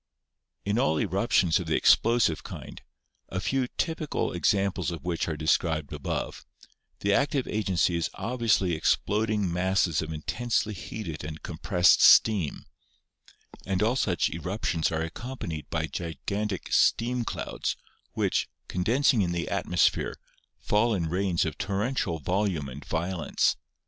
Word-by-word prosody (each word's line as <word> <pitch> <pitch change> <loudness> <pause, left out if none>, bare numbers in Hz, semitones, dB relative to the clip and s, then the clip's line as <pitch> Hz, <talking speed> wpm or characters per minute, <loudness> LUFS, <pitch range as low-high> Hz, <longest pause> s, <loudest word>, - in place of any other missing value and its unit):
In 100 +3 +1
all 80 -8 +2
eruptions 85 -4 +2
of - - -5
the - - +1
explosive 115 -9 +3
kind, - - -9 0.5
a 95 - -3
few 130 +6 0
typical 160 +2 -2
ex 90 - +3
amples 100 -3 -1
of 85 -1 -6
which 85 -2 -1
are 80 -2 -3
described 80 -1 0
above, - - -4 0.6
the 100 0 +2
active 140 +3 +1
agency 95 -4 +1
is 85 - -1
obviously 115 -7 +1
exploding 105 +4 +1
masses 90 -3 +1
of 80 0 -5
intensely 110 +7 -1
heated 85 -7 -6
and 80 +1 -7
com 85 -3 -7
pressed 90 -3 +4
steam, 100 -10 +5 1.0
and 95 +1 0
all 115 +4 +2
such 95 -9 +1
eruptions 85 -1 -1
are 80 0 -1
accompanied 85 - -6
by 80 -1 -1
gigantic 95 +5 -4
steam 120 +1 +3
clouds, - - -3 0.4
which, - - 0 0.2
condensing 115 +6 +2
in 90 -2 0
the 85 -1 -2
atmos - - +3
phere, - - -2 0.4
fall 110 +2 +1
in 85 -4 -1
rains 90 0 +1
of 80 -2 -5
torrential 100 -3 -1
volume 90 -2 -1
and 70 +3 -9
violence. 85 +1 0
95 Hz, 140 wpm, -27 LUFS, 80-110 Hz, 1.0 s, steam